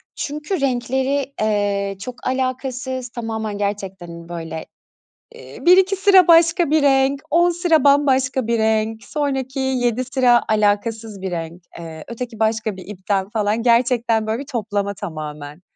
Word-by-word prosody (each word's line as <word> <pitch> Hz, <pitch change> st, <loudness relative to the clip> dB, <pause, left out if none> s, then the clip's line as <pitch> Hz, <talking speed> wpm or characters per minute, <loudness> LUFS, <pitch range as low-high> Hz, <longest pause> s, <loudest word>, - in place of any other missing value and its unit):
Çünkü 300 Hz, +4 st, -4 dB
renkleri, 265 Hz, +2 st, -1 dB
eee, 200 Hz, -2 st, 0 dB
çok 250 Hz, +4 st, -6 dB
alakasız 260 Hz, 0 st, -3 dB
tamamen 220 Hz, -3 st, -4 dB
gerçekten, 195 Hz, -3 st, -4 dB
hani, 170 Hz, 0 st, -10 dB
böyle, 165 Hz, -2 st, -6 dB, 0.7 s
iii, -, -, -12 dB
1-2 375 Hz, +2 st, +5 dB
sıra 385 Hz, -2 st, +5 dB
başka 335 Hz, 0 st, +5 dB
bir 310 Hz, 0 st, +4 dB
renk, 275 Hz, 0 st, +3 dB
10 345 Hz, +3 st, +4 dB
sıra 335 Hz, -4 st, +2 dB
bambaşka 265 Hz, -3 st, +3 dB
bir 235 Hz, 0 st, +1 dB
renk, 220 Hz, 0 st, 0 dB
sonraki 270 Hz, +1 st, -3 dB
7 255 Hz, -2 st, 0 dB
sıra 250 Hz, -2 st, +3 dB
alakasız 215 Hz, 0 st, 0 dB
bir 190 Hz, -1 st, -4 dB
renk, 170 Hz, +1 st, -5 dB, 0.2 s
eee, 160 Hz, -2 st, -8 dB
öteki 235 Hz, -1 st, -7 dB
başka 220 Hz, -1 st, 0 dB
bir 185 Hz, -, -11 dB
ipten 195 Hz, -1 st, -2 dB
falan 215 Hz, 0 st, -1 dB
gerçekten 235 Hz, -2 st, +2 dB
böyle 220 Hz, +2 st, -1 dB
bir 280 Hz, -, -10 dB
toplama 205 Hz, -5 st, -2 dB
tamamen. 155 Hz, -4 st, -7 dB
235 Hz, 140 wpm, -20 LUFS, 205-270 Hz, 0.7 s, 1-2